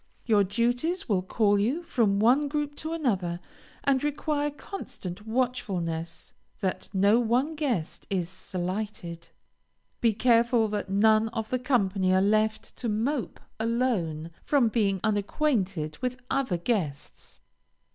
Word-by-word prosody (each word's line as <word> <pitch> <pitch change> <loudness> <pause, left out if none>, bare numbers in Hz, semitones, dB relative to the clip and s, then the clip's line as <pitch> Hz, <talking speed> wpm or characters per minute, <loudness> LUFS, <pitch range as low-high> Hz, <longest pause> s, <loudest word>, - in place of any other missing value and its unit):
Your 210 -4 +4
duties 245 - 0
will 200 -5 +2
call 205 +2 +2
you 260 +12 0
from 225 -11 +1
one 255 +7 +4
group 295 0 -2
to 315 - -4
another, 195 - -1 0.4
and 270 -1 +2
require 295 0 0
constant 220 - -8
watchfulness 190 -10 -2 0.3
that 190 -3 -2
no 200 +3 +4
one 245 +6 +1
guest 245 - -2
is 185 -4 0
slighted. 185 -1 -5 0.7
Be 230 -2 +4
careful 235 0 +3
that 205 -2 -3
none 215 +2 +4
of 220 -1 -4
the 255 - +1
company 200 -7 +1
are - - +5
left 215 +2 +1
to 240 - -2
mope 230 - -1 0.2
alone 220 -9 0
from 270 -6 +3
being 200 -5 +1
unacquainted 200 - 0
with 250 0 -2
other 265 -10 +1
guests. 170 - -3
220 Hz, 125 wpm, -27 LUFS, 190-255 Hz, 0.7 s, are